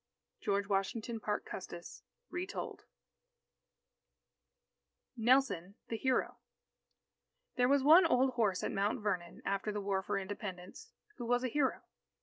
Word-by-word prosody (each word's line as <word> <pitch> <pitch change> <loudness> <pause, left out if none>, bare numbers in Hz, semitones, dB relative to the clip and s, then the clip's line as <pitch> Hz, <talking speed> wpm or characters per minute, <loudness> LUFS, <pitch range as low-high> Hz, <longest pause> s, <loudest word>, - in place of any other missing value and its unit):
George 200 - 0
Washington 215 +3 -1
Parke 210 -1 -2
Custis 175 -2 -8 0.3
(Retold) 360 +3 -5 2.3
NELSON 230 -6 +2
THE 230 - -1
HERO 260 +2 0 1.2
There 245 -1 +3
was 280 -1 +4
one 330 +5 +8
old 260 -2 +3
horse 215 -7 +1
at - - -1
Mount 205 +2 0
Vernon, 180 -5 -3
after 200 +2 -1
the 210 - -3
War 195 -1 0
for 200 +1 -2
Independence, 190 -2 -6 0.3
who 240 - -5
was 245 +1 +2
a 255 - 0
hero. 265 0 0
215 Hz, 125 wpm, -34 LUFS, 195-255 Hz, 2.3 s, one